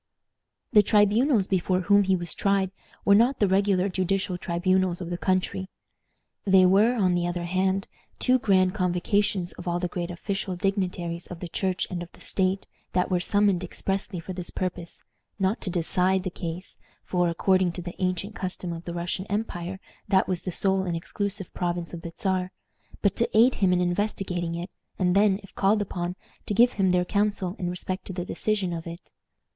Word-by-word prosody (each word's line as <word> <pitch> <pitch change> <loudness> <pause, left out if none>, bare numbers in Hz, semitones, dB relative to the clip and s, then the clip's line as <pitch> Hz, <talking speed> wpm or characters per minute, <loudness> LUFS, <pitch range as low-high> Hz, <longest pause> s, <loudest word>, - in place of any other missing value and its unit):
The 210 - +8
tribunals 210 +3 +3
before 185 -1 +1
whom 200 +2 +4
he 190 0 +3
was 175 -1 -3
tried 195 -2 +1 0.3
were 200 - +6
not 235 +6 +4
the 205 - +3
regular 195 0 +2
judicial 190 0 -1
tribunals 180 +1 +1
of 175 -1 -5
the 175 - -2
country. 185 0 0 0.7
They 190 -1 +6
were, 205 +6 +5
on 190 -6 +2
the 175 0 +1
other 175 0 -2
hand, 190 +2 0 0.3
two 255 0 +3
grand 185 -6 +3
convocations 185 0 0
of 180 - -10
all 175 0 +1
the 180 - -1
great 175 0 -4
official 190 +1 -3
dignitaries 180 -3 -2
of 180 - -8
the 175 - -5
Church 185 +1 -1
and 175 -1 -3
of 175 - -8
the - - -17
state, 190 0 -1 0.3
that 180 +1 +1
were 180 - +3
summoned 200 -1 +3
expressly 195 +1 -3
for 185 +3 -6
this 180 -1 -6
purpose 180 -2 -4 0.3
not 195 +2 0
to - - -3
decide 180 +2 +1
the 185 - -3
case, 175 +2 -6 0.3
for, 180 -1 +1
according 185 +1 +2
to 180 - -6
the 175 0 -6
ancient 185 +3 -1
customs 180 -2 -4
of 165 - -12
the 170 - -5
Russian 180 +3 -3
empire, 190 -3 -3 0.3
that 190 -2 +3
was 185 -2 -1
the 185 - -4
sole 190 +2 +2
and 175 -3 -2
exclusive 200 +2 -4
province 175 -1 -2
of 170 - -6
the 170 - -7
Czar, 185 -1 0 0.5
but 200 - +3
to 235 - +1
aid 245 +3 +6
him 190 -2 +4
in 180 - +3
investigating 180 -2 -1
it, 175 +3 -5 0.3
and 180 -1 +2
then, 200 -1 +4
if 195 - -15
called 205 +2 +3
upon, 180 -3 -3 0.3
to 205 - -1
give 240 +3 +6
him 195 -2 +1
their 180 0 +2
counsel 200 -2 0
in 175 - -1
respect 185 +1 -4
to 190 - -6
the 175 -1 -4
decision 200 -4 -1
of 165 0 -5
it. 170 +2 -9
185 Hz, 190 wpm, -26 LUFS, 175-195 Hz, 0.7 s, The